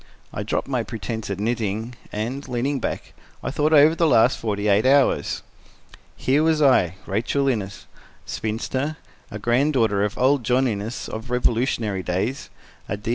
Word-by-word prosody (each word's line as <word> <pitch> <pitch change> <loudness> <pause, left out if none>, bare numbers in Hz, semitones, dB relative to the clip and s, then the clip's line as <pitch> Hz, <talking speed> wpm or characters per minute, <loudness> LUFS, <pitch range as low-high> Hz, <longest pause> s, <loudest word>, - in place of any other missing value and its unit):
I - - -3
dropped - - -2
my 130 -3 0
pretense 110 -1 -5
at 100 -1 -3
knitting 110 +1 -2 0.2
and, 120 +7 -4
leaning 130 +3 -1
back, - - -4 0.3
I - - -2
thought 150 +2 +1
over 155 +1 +7
the 165 0 +2
last 120 -2 +4
forty 105 -2 -2
eight 100 +1 +4
hours. 135 +1 +2 0.7
Here 135 +3 +2
was 160 -1 +2
I, 125 - +4
Rachel 120 +8 0
Innes, 105 -6 -2 0.4
spinster, 130 +7 -3 0.3
a 105 - -6
granddaughter 120 -3 +2
of 105 0 -2
old 130 +1 +3
John 130 +3 +2
Innes 110 +1 -4
of 110 +3 -7
Revolutionary 115 -4 0
days, 95 +10 -2 0.4
a 100 - -2
D. 105 +2 -6
120 Hz, 155 wpm, -23 LUFS, 105-135 Hz, 0.7 s, over